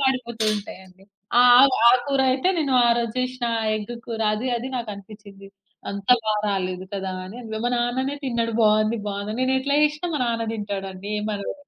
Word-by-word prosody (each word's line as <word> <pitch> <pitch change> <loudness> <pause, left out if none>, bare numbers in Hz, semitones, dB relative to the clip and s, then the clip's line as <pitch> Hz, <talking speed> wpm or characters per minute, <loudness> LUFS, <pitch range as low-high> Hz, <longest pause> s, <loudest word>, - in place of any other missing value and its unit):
మాడిపోతూ 250 -4 -1
ఉంటాయండి. 190 -2 -11 0.3
ఆ! - - +8 0.2
ఆ! - - +9 0.2
ఆ - - +9 0.2
కూరైతే 265 +2 +1
నేను 280 -5 0
ఆరోజు 235 -1 +1
చేషినా 255 -1 -2 0.3
ఎగ్గు 215 +3 -6
కూర, 230 -1 -5
అది 235 +5 -3
అది 240 +2 -5
నాకనిపిచ్చింది. 205 -3 -9 0.4
అంత 200 -1 -7 0.2
బా 215 -1 +1
రాలేదు 185 -2 -2
కదా 190 -1 -3
అని. 210 +6 -10 0.3
మా 245 - +1
నాన్ననే 260 +4 -1
తిన్నాడు 235 -3 -1
బావుంది, 215 +1 +3
బావుందని. 205 +3 -4
నేనెట్లా 265 +2 +1
జేషినా 300 +3 0
మా 295 - -2
నాన్న 230 -1 -1
దింటాడండి. 200 -2 -5
ఏమనడు. 210 -1 -4
230 Hz, 155 wpm, -23 LUFS, 200-255 Hz, 0.4 s, ఆ